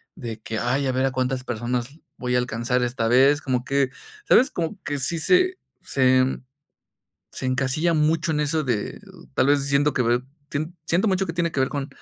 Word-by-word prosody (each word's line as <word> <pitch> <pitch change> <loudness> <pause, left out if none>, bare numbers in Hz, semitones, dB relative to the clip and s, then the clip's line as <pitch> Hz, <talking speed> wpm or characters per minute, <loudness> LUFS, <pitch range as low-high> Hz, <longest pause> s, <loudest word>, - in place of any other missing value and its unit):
de 115 -3 -6
que: 110 -1 -3
"Ay, 130 +4 0
a - - +1
ver 130 +1 +1
a - - -1
cuántas 130 0 -1
personas 125 +4 -3 0.2
voy 125 0 -1
a - - +4
alcanzar 125 +1 -1
esta 120 -1 -1
vez", 135 +5 +5
como 130 -3 -1
que, 140 -1 +1 0.4
¿sabes?, 265 +4 +5
como 170 +4 -3
que 145 -1 -3
sí 150 +6 -1
se 365 - +3 0.2
se 130 -1 +3
en 130 0 0 0.9
se - - -5
encasilla 135 +6 +1
mucho 160 +1 +1
en 150 - 0
eso 150 +2 0
de, 120 -6 -2 0.3
tal - - +3
vez, 145 -1 +3
siento 145 +1 +2
que 125 - +2
ve, 120 +1 +1 0.3
sien 155 +4 -3
siento 180 +7 +2
mucho 190 0 +1
que 165 - -3
tiene 170 -1 0
que 140 - -1
ver 130 - +1
con 140 -1 -3
135 Hz, 205 wpm, -24 LUFS, 125-155 Hz, 0.9 s, vez